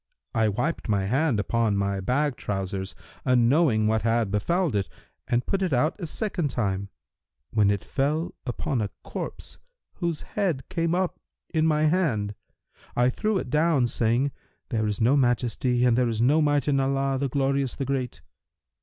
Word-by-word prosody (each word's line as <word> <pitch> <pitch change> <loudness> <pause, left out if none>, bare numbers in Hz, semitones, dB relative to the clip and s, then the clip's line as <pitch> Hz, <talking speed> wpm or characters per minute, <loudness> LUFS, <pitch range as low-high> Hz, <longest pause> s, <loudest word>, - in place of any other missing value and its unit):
I 110 -3 +2
wiped 125 +7 -2
my 100 -2 +1
hand 130 +2 +1
upon 110 0 +1
my 100 0 0
bag 130 +7 0
trousers, 95 -2 -4 0.3
unknowing 125 -1 +3
what 110 0 +2
had 115 -2 +1
befouled 165 - +1
it, 100 -3 0 0.4
and 120 +1 +1
put 195 -1 -1
it 180 -6 0
out 150 +7 +2
a 170 - -4
second 185 -3 -2
time, 100 -5 -2 0.6
when 105 -2 +3
it 100 -3 0
fell 150 +4 -1
upon 125 0 -2
a 105 - -1
corpse - - -7 0.4
whose 170 -4 -2
head 175 -10 -1
came 170 -2 0
up 185 -1 -1 0.3
in 160 -1 +3
my 155 -1 +2
hand. 150 - +1 0.6
I 125 +1 +3
threw 215 - 0
it 125 - -4
down, 155 -4 +3
saying, 120 +4 +1 0.4
'There 110 -3 0
is 105 -1 -2
no 120 +5 +4
Majesty 125 -1 +1
and 120 -2 +4
there 125 -1 +2
is 110 -1 -2
no 140 +7 +4
Might 145 -1 +2
in 140 -2 +3
Allah, 135 0 +1
the 140 0 0
Glorious, 135 0 0
the 135 - -3
Great!' 130 -2 -3
125 Hz, 170 wpm, -26 LUFS, 110-150 Hz, 0.6 s, no